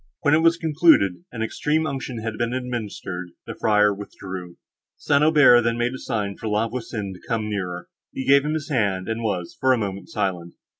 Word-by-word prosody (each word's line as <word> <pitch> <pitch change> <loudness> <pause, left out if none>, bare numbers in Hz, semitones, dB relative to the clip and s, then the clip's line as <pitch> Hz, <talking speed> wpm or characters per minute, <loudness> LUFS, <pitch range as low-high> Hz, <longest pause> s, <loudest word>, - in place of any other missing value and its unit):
When 145 - +3
it 155 - +5
was 165 0 +4
concluded, 150 - +3
and 115 -2 -3
extreme 150 +7 0
unction 130 -5 -4
had 115 -1 -3
been 120 +2 -1
administered, 105 -8 -5
the - - -6
friar 105 -1 +3
withdrew. 95 -3 -8 0.4
St. 145 0 +2
Aubert 145 -6 +6
then 115 0 0
made 120 +1 0
a 130 - -6
sign 100 -2 -3
for 110 - -6
La 105 +2 +1
Voisin 115 -5 -5
to 90 - -15
come 110 -2 -1
nearer. 90 -3 -4 0.2
He 130 - -5
gave 140 0 +6
him 150 +1 -1
his 155 -1 -4
hand, 100 -9 0
and 115 +1 -2
was, 95 -6 -3
for 130 0 +4
a - - +1
moment, 100 -4 -4
silent. 90 -3 -3
115 Hz, 200 wpm, -23 LUFS, 100-130 Hz, 0.4 s, Aubert